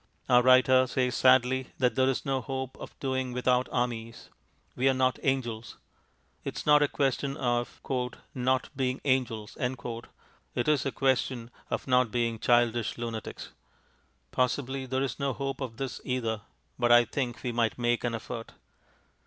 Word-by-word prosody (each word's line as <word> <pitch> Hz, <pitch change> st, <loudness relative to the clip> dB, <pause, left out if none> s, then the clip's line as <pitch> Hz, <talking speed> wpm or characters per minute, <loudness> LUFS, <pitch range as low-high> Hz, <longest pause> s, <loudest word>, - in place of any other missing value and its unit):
Our 125 Hz, 0 st, +6 dB
writer 130 Hz, +1 st, +6 dB
says 125 Hz, 0 st, 0 dB
sadly 130 Hz, +1 st, +3 dB
that 125 Hz, -1 st, +2 dB
there 130 Hz, 0 st, +3 dB
is 135 Hz, -, -2 dB
no 135 Hz, -1 st, 0 dB
hope 130 Hz, -1 st, -4 dB
of -, -, -10 dB
doing 130 Hz, -2 st, -2 dB
without 125 Hz, 0 st, +1 dB
armies 115 Hz, -2 st, -3 dB, 0.5 s
we 130 Hz, +2 st, +3 dB
are 135 Hz, -, +2 dB
not 130 Hz, 0 st, +1 dB
angels. 120 Hz, -4 st, -2 dB, 0.7 s
It -, -, -5 dB
is -, -, -5 dB
not 150 Hz, 0 st, +6 dB
a 145 Hz, -, +4 dB
question 140 Hz, 0 st, -1 dB
of 120 Hz, -3 st, -1 dB, 0.5 s
"not 130 Hz, 0 st, 0 dB
being 130 Hz, -1 st, -1 dB
angels," 120 Hz, -5 st, 0 dB, 1.0 s
it 120 Hz, -, 0 dB
is 150 Hz, -2 st, +2 dB
a -, -, -1 dB
question 130 Hz, -3 st, 0 dB, 0.2 s
of -, -, -2 dB
not 125 Hz, -2 st, +4 dB
being 115 Hz, -1 st, -1 dB
childish 120 Hz, -1 st, +2 dB
lunatics. 115 Hz, -2 st, -6 dB, 0.8 s
Possibly 130 Hz, +1 st, -1 dB
there 130 Hz, +1 st, 0 dB
is 135 Hz, 0 st, -3 dB
no 140 Hz, -1 st, 0 dB
hope 135 Hz, +1 st, -4 dB
of 120 Hz, -4 st, -5 dB
this 135 Hz, -2 st, -4 dB
either, 115 Hz, -4 st, -2 dB, 0.4 s
but 120 Hz, -1 st, +3 dB
I 120 Hz, 0 st, +7 dB
think 120 Hz, -2 st, -3 dB
we 125 Hz, -, -1 dB
might 115 Hz, -2 st, 0 dB
make 120 Hz, -1 st, +1 dB
an 120 Hz, -1 st, 0 dB
effort. 115 Hz, 0 st, -7 dB
125 Hz, 160 wpm, -29 LUFS, 120-130 Hz, 1.0 s, I